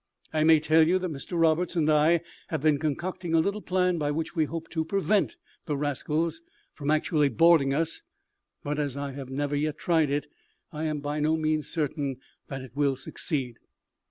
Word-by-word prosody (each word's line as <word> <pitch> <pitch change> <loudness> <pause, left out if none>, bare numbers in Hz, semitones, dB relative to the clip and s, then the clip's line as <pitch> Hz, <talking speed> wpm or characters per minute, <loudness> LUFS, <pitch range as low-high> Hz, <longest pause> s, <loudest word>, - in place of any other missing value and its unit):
I 155 -1 +2
may 160 0 +6
tell 155 +1 +4
you 180 +2 +3
that 185 -2 -3
Mr 155 +4 -4
Roberts 165 +2 +2
and 160 -3 +2
I 155 +2 +4 0.3
have 160 -3 -3
been 150 -2 +3
concocting 165 +3 -2
a - - +5
little 200 +6 0
plan 180 -2 +1
by 145 -1 0
which 160 +4 -3
we 160 -2 +2
hope 165 +1 -6
to 160 -2 -1
prevent 200 - +1 0.3
the 150 -3 -1
rascals 150 - -1 0.3
from 145 -1 -4
actually 155 -1 +2
boarding 150 +1 +5
us; 160 +3 -1 0.6
but, 145 +1 -2
as 140 -2 -2
I 140 0 -3
have 135 -1 -8
never 145 +2 -2
yet 150 +1 -1
tried 160 -4 +2
it, 145 +1 -1 0.5
I 155 0 -4
am 155 -2 -2
by 145 +1 -2
no 155 +2 +2
means 155 -1 0
certain 145 -4 -2 0.3
that 135 -1 -6
it 130 -1 -13
will 140 -2 +2
succeed. 130 -2 -4
155 Hz, 190 wpm, -27 LUFS, 145-165 Hz, 0.6 s, may